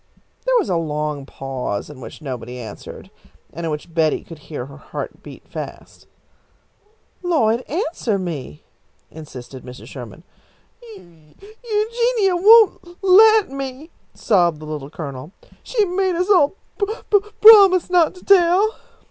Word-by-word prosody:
There - - +3
was 430 - 0
a 175 - 0
long 150 -3 -3
pause 130 -8 -5
in 145 -3 -12
which 155 - -11
nobody 125 -3 -6
answered, 110 -4 -10 0.4
and 165 +2 -5
in - - -2
which 150 +3 -7
Betty 160 -2 +1
could 165 -2 -12
hear 145 -4 -7
her 140 +1 -13
heart - - -8
beat - - -13
fast. - - -9 1.1
"Lloyd, 245 -11 +1
answer 310 - -2
me," 150 - -6 0.5
insisted 135 -4 -11
Mrs. 125 0 -11
Sherman. 130 +4 -10 0.7
"Eu 160 - -19 0.3
Eugenia 450 -2 0
won't 430 +3 +6
l 345 0 -16
let 425 0 +6
me!" 275 +3 -7 0.2
sobbed 175 -7 +1
the 155 - -10
Little 150 -2 -6
Colonel. 150 +1 -8 0.3
"She 440 -4 0
made 370 0 -1
us 365 +4 0
all 340 -3 +4 0.2
p 405 - 0 0.5
promise 400 -5 +8
not 350 -1 +3
to 365 - -16
tell." 390 +3 +4
215 Hz, 140 wpm, -20 LUFS, -, 1.1 s, promise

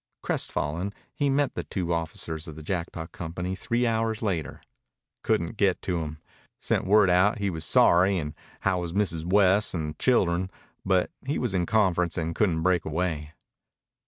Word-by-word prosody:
Crestfallen, 90 +7 -2 0.2
he 145 -1 0
met 140 0 +1
the - - -4
two 90 -3 -2
officers 80 0 -4
of 80 - -8
the 80 - -9
Jackpot 85 -2 -4
Company 90 +2 -4
three 120 +6 0
hours 115 -1 0
later. 90 -7 -2 0.6
"Couldn't 105 -2 0
get 95 -3 +2
to 90 -2 -1
him. 80 -1 -5 0.4
Sent - - 0
word 105 0 +6
out 95 +4 +4
he 100 -2 -1
was 80 -2 -4
sorry, 95 +6 +5
an' 75 -3 -3 0.3
how 95 -2 +1
was 85 -1 -4
Mrs. 85 -5 0
West 100 0 +4
an' 80 -2 -2
the - - -6
children, 95 -7 +2 0.3
but 95 -2 +2 0.2
he 145 - 0
was 120 -6 -1
in 90 -2 0
conference 90 -6 +2
an' 80 0 -1
couldn't 85 -5 +1
break 90 -2 +2
away." 80 -1 -2
90 Hz, 170 wpm, -27 LUFS, 85-100 Hz, 0.6 s, word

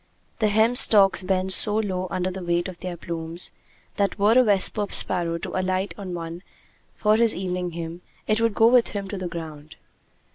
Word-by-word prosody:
The 215 - +2
hemp 220 +4 +2
stalks 195 -3 +5
bend 190 0 -1
so 210 +2 +6
low 190 -4 -2
under 185 +1 -3
the 190 0 -8
weight 175 +1 -1
of 180 -2 -10
their 180 -2 -7
plumes, 165 +1 -4 0.5
that 200 0 -1
were 205 +1 +2
a 255 - +6
vesper 205 -1 +2
sparrow 170 -2 +2
to - - -7
alight 185 +1 -2
on 190 -3 -7
one 165 0 -7 0.5
for 215 0 +1
his 230 -1 +3
evening 180 -1 -4
hymn, 170 +1 -7 0.2
it 215 +1 0
would 230 -2 0
go 225 - +3
with 240 0 +4
him 200 -1 -6
to 205 - -5
the 185 - -4
ground. 155 -3 -9
185 Hz, 190 wpm, -23 LUFS, 175-210 Hz, 0.5 s, so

